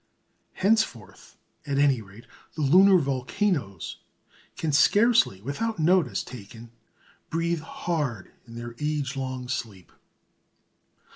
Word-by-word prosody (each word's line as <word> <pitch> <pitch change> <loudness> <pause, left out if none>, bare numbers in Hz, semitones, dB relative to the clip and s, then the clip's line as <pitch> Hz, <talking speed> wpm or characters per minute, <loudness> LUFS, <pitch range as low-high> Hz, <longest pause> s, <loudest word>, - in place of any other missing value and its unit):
Henceforth, 185 - -1 0.3
at 140 -1 -1
any 140 -4 +3
rate, 100 +2 -14 0.3
the 155 - -2
lunar 185 +7 +6
volcanoes 135 - -2 0.6
can 160 - -1
scarcely, 205 - +4
without 215 - -3
notice 160 - +2
taken, 115 0 -11 0.6
breathe 165 0 -1
hard 150 - -3 0.2
in 115 - -11
their 120 0 -7
age 150 -3 -2
long 130 -1 -4
sleep. 110 -8 -5
140 Hz, 100 wpm, -26 LUFS, 115-170 Hz, 0.6 s, lunar